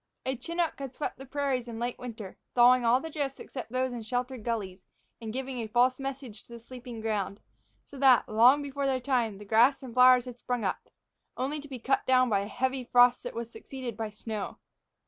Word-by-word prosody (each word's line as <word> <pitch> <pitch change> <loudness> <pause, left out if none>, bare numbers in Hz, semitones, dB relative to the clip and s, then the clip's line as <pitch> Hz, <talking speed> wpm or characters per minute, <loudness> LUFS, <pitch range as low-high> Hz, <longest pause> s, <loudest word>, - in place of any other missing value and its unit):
A 260 +1 -1
chinook 335 +4 -2
had 270 -2 -6
swept 295 - -4
the 270 - -10
prairies 270 -3 -1
in 235 - -6
the 225 - -6
late 240 0 -3
winter, 220 -6 -8 0.2
thawing 245 +1 +6
all 235 +2 +4
the 320 +3 -7
drifts 280 -3 -3
except 255 -4 -8
those 255 0 -1
in 240 - -5
sheltered 245 +1 -3
gullies, 200 -6 -4 0.3
and 220 -1 -5
giving 260 +1 -4
a 225 - -3
false 250 +3 +2
message 270 -5 -6
to - - -21
the 235 - -8
sleeping 240 -1 -9
ground; 210 -3 -2 0.5
so 280 - -12
that, 260 -3 +5
long 245 +7 +5
before 280 0 -2
their 265 -1 +1
time, 245 -6 0
the 210 - -11
grass 235 +7 +4
and 250 -3 -8
flowers 250 0 +6
had 245 -1 -9
sprung 245 -2 -2
up, 190 - -3 0.5
only 275 +5 -2
to 295 - -11
be 265 -3 -7
cut 270 +3 0
down 255 -1 +4
by 200 - +3
a 200 - -4
heavy 260 +3 -1
frost 245 0 +5
that - - -7
was 235 0 -5
succeeded 255 -4 -7
by 220 0 -4
snow. 210 -1 -6
250 Hz, 220 wpm, -29 LUFS, 230-265 Hz, 0.5 s, thawing